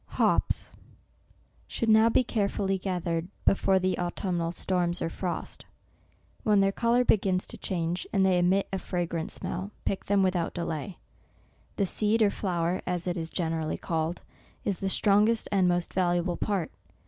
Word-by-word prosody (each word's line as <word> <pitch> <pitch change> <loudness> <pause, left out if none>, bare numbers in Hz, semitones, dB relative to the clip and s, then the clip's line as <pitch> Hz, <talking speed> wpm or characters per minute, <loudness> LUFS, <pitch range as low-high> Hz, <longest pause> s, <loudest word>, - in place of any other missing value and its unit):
HOPS - - +1 0.9
should 230 - -2
now 220 +1 +6
be 240 - +3
carefully 200 -4 -1
gathered, 175 -3 -2 0.2
before 195 0 +3
the 185 0 0
autumnal 175 -1 -1
storms, 175 -1 -1
or 165 - -2
frost. 180 0 -5 0.8
When 210 -2 +3
their 195 0 +3
col* 235 +3 +1
our 250 - +4
begins 190 -4 +2
to - - -7
change, 175 -1 -2
and 195 -1 +3
they 185 -2 +3
emit 185 +3 +2
a 190 - 0
fragrant 170 -3 -3
smell, 190 +3 -4 0.2
pick 195 - -2
them 200 -1 +3
without 180 -3 0
delay. 170 +1 -4 0.8
The 200 - +1
seed, 215 +4 +2
or 205 - +3
flower, 175 -3 -1
as 180 -1 -2
it 175 -1 -1
is 165 -2 -3
generally 160 -3 -2
called, 165 +1 -2 0.4
is 195 - -1
the 195 - -1
strongest 210 +3 +3
and 190 -3 +3
most 175 -1 0
valuable 175 -1 +1
part. 195 -2 -2
185 Hz, 160 wpm, -28 LUFS, 175-200 Hz, 0.9 s, now